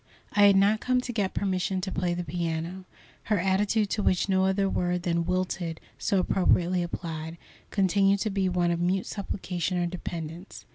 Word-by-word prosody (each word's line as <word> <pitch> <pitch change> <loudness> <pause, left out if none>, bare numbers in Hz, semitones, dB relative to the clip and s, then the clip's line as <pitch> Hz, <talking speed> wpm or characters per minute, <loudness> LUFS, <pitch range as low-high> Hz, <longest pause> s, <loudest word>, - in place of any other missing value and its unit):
I 205 -1 +6
had 200 - +6
not 200 +3 +4
come 255 +2 +1
to 245 -1 -5
get 205 -4 -1
permission 190 -1 0
to 190 - -3
play 175 0 -1
the 175 - -3
piano. 170 +2 -3 0.4
Her 215 - +1
attitude, 200 +3 +1
to 215 - 0
which 185 -2 +2
no 190 -1 +2
other 195 +1 +2
word 180 -1 -1
than 170 -1 0
"wilted" 180 -2 -2 0.2
so 200 - +1
appropriately 180 -1 +2
applied, 165 -1 -5 0.3
continued 195 0 +3
to 215 - 0
be 195 -1 +1
one 175 -1 +1
of 170 - -1
mute 185 +2 +1
supplication 185 -3 -3
or 175 - +1
dependence. 170 0 -6
185 Hz, 180 wpm, -27 LUFS, 175-195 Hz, 0.4 s, I